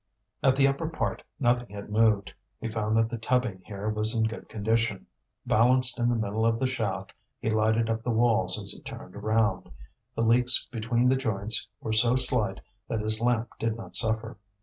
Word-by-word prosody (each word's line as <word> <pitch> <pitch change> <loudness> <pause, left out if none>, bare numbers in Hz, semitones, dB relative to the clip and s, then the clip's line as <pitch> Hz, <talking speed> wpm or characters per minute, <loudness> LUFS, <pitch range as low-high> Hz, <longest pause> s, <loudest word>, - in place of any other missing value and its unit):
At 130 -1 +3
the 135 0 +4
upper 140 +4 -2
part 160 - -3 0.2
nothing 120 -2 +1
had 100 +1 -8
moved. 105 -5 +2 0.3
He 115 - -4
found 110 0 -1
that 115 0 +3
the 115 0 -6
tubbing 115 -5 -1
here 100 0 -6
was 110 +1 +2
in 115 - +1
good 110 +1 -4
condition. 110 -1 -1 0.4
Balanced 125 +2 +3
in 120 0 +2
the 120 - +1
middle 110 0 -2
of 115 0 +2
the 130 - 0
shaft 130 - -3 0.3
he 110 - -2
lighted 110 +1 +1
up 115 0 -2
the 120 - -4
walls 115 -1 +2
as - - 0
he - - -9
turned - - -10
round; 110 +1 0 0.5
the 115 - 0
leaks 120 +2 +4
between 120 +1 0
the 130 - +4
joints 110 -4 0
were 110 - -3
so 120 +3 +4
slight 130 -1 +2 0.3
that 110 - -2
his 110 +1 +4
lamp 120 -1 +1
did 115 0 -1
not 115 - -9
suffer. 110 0 +1
115 Hz, 195 wpm, -27 LUFS, 110-120 Hz, 0.5 s, the